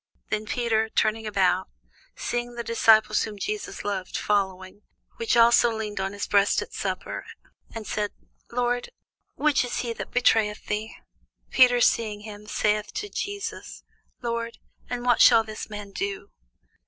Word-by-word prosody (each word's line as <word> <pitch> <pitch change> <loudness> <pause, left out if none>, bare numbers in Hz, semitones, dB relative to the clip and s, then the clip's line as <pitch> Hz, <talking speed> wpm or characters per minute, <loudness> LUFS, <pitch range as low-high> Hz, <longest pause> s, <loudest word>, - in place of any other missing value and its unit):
Then 215 0 -1
Peter, 220 -2 +1
turning 220 0 0
about, 190 -2 +2 0.5
seeth 240 0 -3
the 235 - -4
disciple 220 -2 +4
whom 215 0 0
Jesus 405 - -4
loved 195 -3 -3
following; 190 -1 -1 0.4
which 460 - +1
also 235 0 +6
leaned 215 -2 -4
on 195 +1 -2
his 205 - -3
breast 200 0 +3
at - - -15
supper, - - -4 0.5
and 225 -1 -5
said, 210 +1 -1 0.4
Lord, 245 - 0 0.5
which 300 -3 +2
is 245 - -2
he 235 -2 -3
that - - -7
betrayeth 220 -4 +2
thee? 215 +1 -3 0.6
Peter 250 -2 +6
seeing 215 -3 +2
him 210 -1 -10
saith 210 0 0
to 420 0 -3
Jesus, 405 0 -5 0.4
Lord, 235 -1 -3 0.3
and 245 0 -4
what 245 -2 +4
shall 230 -2 +7
this 215 0 -7
man 210 -1 -7
do? 200 0 -4
220 Hz, 145 wpm, -26 LUFS, 205-240 Hz, 0.6 s, shall